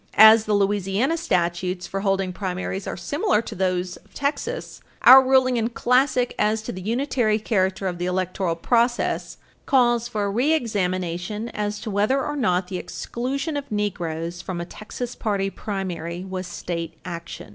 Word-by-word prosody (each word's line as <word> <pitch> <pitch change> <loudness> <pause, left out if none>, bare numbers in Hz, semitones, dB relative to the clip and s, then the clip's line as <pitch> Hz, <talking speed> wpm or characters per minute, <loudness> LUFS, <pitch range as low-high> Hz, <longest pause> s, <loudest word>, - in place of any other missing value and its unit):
As 220 +1 +9
the 210 - +1
Louisiana 200 - +1
statutes 180 - -1
for 195 - -4
holding 195 -2 0
primaries 185 0 -4
are - - -4
similar 290 - +1
to - - -7
those 180 -1 -1
of - - -24
Texas, 295 - -3 0.2
our 265 +2 +11
ruling 260 -1 +3
in 225 -1 +1
Classic 250 +1 +2
as 215 +1 +1
to - - -4
the 185 - -7
unitary 230 0 +1
character 195 -3 0
of 175 -2 -2
the 175 - -1
electoral 185 -1 -1
process 235 +7 0 0.3
calls 240 -3 +3
for 210 -3 -2
a 200 - -1
reexamination 210 - -1
as 210 -1 -3
to 220 - -4
whether 215 +7 +1
or 295 - -3
not 185 -9 +1
the 180 -1 -4
exclusion 275 +6 -4
of 285 -3 -5
Negroes 175 -5 -2
from 185 -1 -5
a 170 - -3
Texas 235 +6 -7
party 200 -3 -1
primary 180 -4 -4
was 185 -1 -4
state 170 -2 -5
action. 170 -2 -7
205 Hz, 160 wpm, -23 LUFS, 180-240 Hz, 0.3 s, our